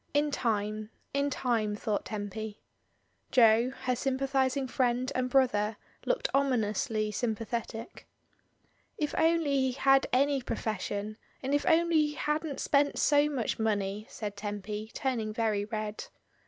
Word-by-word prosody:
In 295 0 +3
time, 215 -4 -1 0.2
in 280 +1 +1
time, 230 -6 0
thought 210 0 -2
Tempy. 210 0 -5 0.7
Jo, 230 0 +5
her 255 -1 +1
sympathising 270 +1 0
friend 250 0 0
and 255 0 0
brother, 220 -5 +2 0.3
looked - - +1
ominously 220 -5 +1
sjmapathetic. 225 +1 -4 0.9
"If 300 -1 -1
only 325 -3 +3
he 260 -1 +2
had 270 +1 +4
any 275 +1 +3
profession, 215 -2 -3 0.3
and 270 +2 -1
if 290 - +1
only 335 -1 +4
he 300 -1 +2
hadn't 300 -1 -2
spent 285 0 +2
so 290 0 +4
much 255 -7 -2
money," 210 -1 -1
said 205 -2 -5
Tempy, 210 +1 -5
turning 230 -5 -1
very 215 -2 0
red. 215 0 -4
240 Hz, 125 wpm, -30 LUFS, 215-275 Hz, 0.9 s, Jo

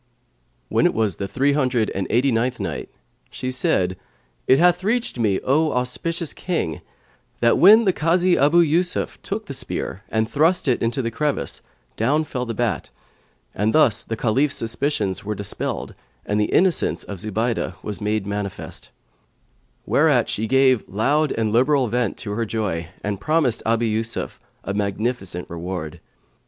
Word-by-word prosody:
When - - +3
it - - -2
was 110 -6 0
the 100 - -3
Three 140 +7 +1
hundred 130 -6 +1
and 95 -1 -3
Eighty 130 +4 +2
ninth 120 +2 0
Night - - -4 0.4
She 130 - -4
said, 95 -7 +1 0.5
It 130 - +6
hath 175 +2 +3
reached 230 - -1
me, 105 -4 +2
O 155 +4 +2
auspicious 155 +6 -1
King, 160 - -3 0.6
that 115 0 +3
when 215 +5 +8
the 190 - +3
Kazi 175 +3 +2
Abu 150 +5 +4
Yusuf 170 +3 0
took 215 +2 -4
the 140 - -6
spear 130 -6 -4
and 110 0 0
thrust 155 +7 +2
it 125 - +2
into 120 +3 0
the 115 - -2
crevice, 145 +4 -1 0.4
down 145 +8 +2
fell 125 -4 -4
the 115 - -3
bat, 120 -4 -1 0.6
and 105 +2 0
thus 135 -9 +4
the 115 - -5
Caliph's 130 +6 +1
suspicions 115 -4 -1
were 105 +1 -3
dispelled 100 0 -4 0.3
and 105 +1 0
the - - +3
innocence 185 -1 +2
of 100 -3 -7
Zubaydah 110 +4 -2
was 105 0 -5
made 105 -1 -1
manifest; 100 -1 -5 1.0
whereat - - +3
she 110 +2 -1
gave 130 -2 +4
loud 140 +10 +1
and 110 -2 -1
liberal 130 +3 +3
vent 120 -2 -1
to 105 - -5
her 115 +3 -1
joy 95 -7 -2 0.2
and 100 -1 -3
promised 155 -4 +1
Abu 115 +1 +2
Yusuf 110 +1 -2 0.2
a 100 - -3
magnificent 100 -2 -2
reward. 85 -1 -6
120 Hz, 160 wpm, -22 LUFS, 105-145 Hz, 1.0 s, when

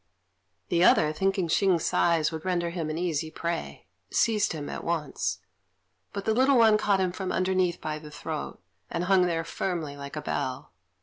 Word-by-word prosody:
The 170 0 +3
other, 155 -4 +5
thinking 190 +1 0
Hsing's 180 0 +2
size 165 -3 +2
would 160 -1 -6
render 175 -2 0
him 165 -3 -3
an 155 - -3
easy 165 -3 -1
prey, 170 +1 -4 0.2
seized 215 -3 +2
him 150 -3 -5
at - - -5
once; 165 -4 -2 0.7
but 200 - -5
the 220 - +2
little 260 +3 +4
one 220 -2 +6
caught 205 -2 +2
him 185 -1 +1
from 185 +1 -4
underneath 185 -2 +1
by 155 -1 -4
the 150 -1 -11
throat, 155 +1 -5 0.3
and 170 - -2
hung 185 -1 +4
there 165 -1 -1
firmly, 165 -4 -3
like 140 0 -8
a 150 - -3
bell. 130 -6 -3
170 Hz, 180 wpm, -27 LUFS, 155-190 Hz, 0.7 s, one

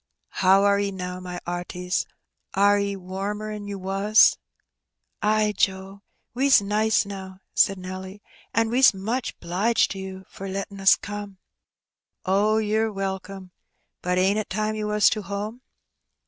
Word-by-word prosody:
" - - -49
How 190 +1 +5
are 200 0 +4
'e 200 0 0
now, 180 -1 -5
my 180 -1 -6
'arties? 180 +1 -3 0.5
Are 205 +1 +4
'e 200 0 -1
warmer'n 205 +3 -5
you 200 -1 -5
was? 195 +3 +4 0.5
" - - -55
"Ay, 215 0 +2
Joe, 190 +1 -1 0.3
we's 270 +3 +5
nice 210 +2 +1
now,*' 190 -2 -8 0.2
said 195 - +3
Nelly; 185 +2 -8 0.3
"an' 225 0 +1
we's 255 -3 +5
much 225 +7 -3
^liged 195 +7 +1
to 195 - -6
you 190 0 -8
for 195 0 -8
lettin' 195 +1 -5
us 195 - +7
come." 205 0 -6
'• - - -27 0.9
Oh, 205 +3 +2
ye're 220 +1 +1
welcome. 195 -1 -5 0.5
Brt 180 0 0
ain't 195 +3 +3
it 215 - -4
time 215 +2 -1
you 215 -1 -3
was 210 0 +3
to 215 - -1
home? 205 +4 -5
200 Hz, 155 wpm, -24 LUFS, 190-210 Hz, 0.9 s, us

